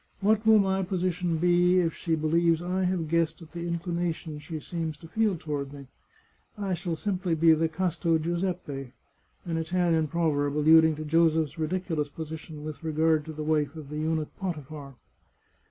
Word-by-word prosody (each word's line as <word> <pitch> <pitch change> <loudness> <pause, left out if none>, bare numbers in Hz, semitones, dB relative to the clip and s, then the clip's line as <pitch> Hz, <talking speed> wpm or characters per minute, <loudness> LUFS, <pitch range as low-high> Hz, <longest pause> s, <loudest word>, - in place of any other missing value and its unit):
What 215 +2 +2
will 220 0 +8
my 195 -1 +2
position 180 -2 -1
be 175 +2 +4
if 165 -2 +1
she 165 -1 -1
believes 165 +1 +2
I 180 +2 -1
have 180 -3 -1
guessed 165 0 +1
at 160 - -15
the 170 0 -5
inclination 170 -2 -3
she 155 +1 -6
seems 160 -1 -4
to 165 - -12
feel 210 +1 +1
toward 145 -3 -4
me? 140 -2 -11 0.7
I 200 -2 -2
shall 175 -1 -2
simply 180 -1 -1
be 160 0 +6
the 160 +1 +1
casto 170 -1 0
Giuseppe 165 -6 -3 0.3
" - - -39
(an 165 -2 -2
Italian 165 -1 +1
proverb 150 -3 0
alluding 160 +1 +6
to 155 +1 -6
Joseph's 160 -1 +2
ridiculous 160 -2 -1
position 160 0 -8
with 155 +1 -7
regard 155 -1 +2
to 160 - -6
the 155 0 -5
wife 150 -1 0
of 155 -3 -9
the 150 - -4
eunuch 155 -1 -2
Potiphar). 150 -6 -6
165 Hz, 170 wpm, -27 LUFS, 155-175 Hz, 0.7 s, will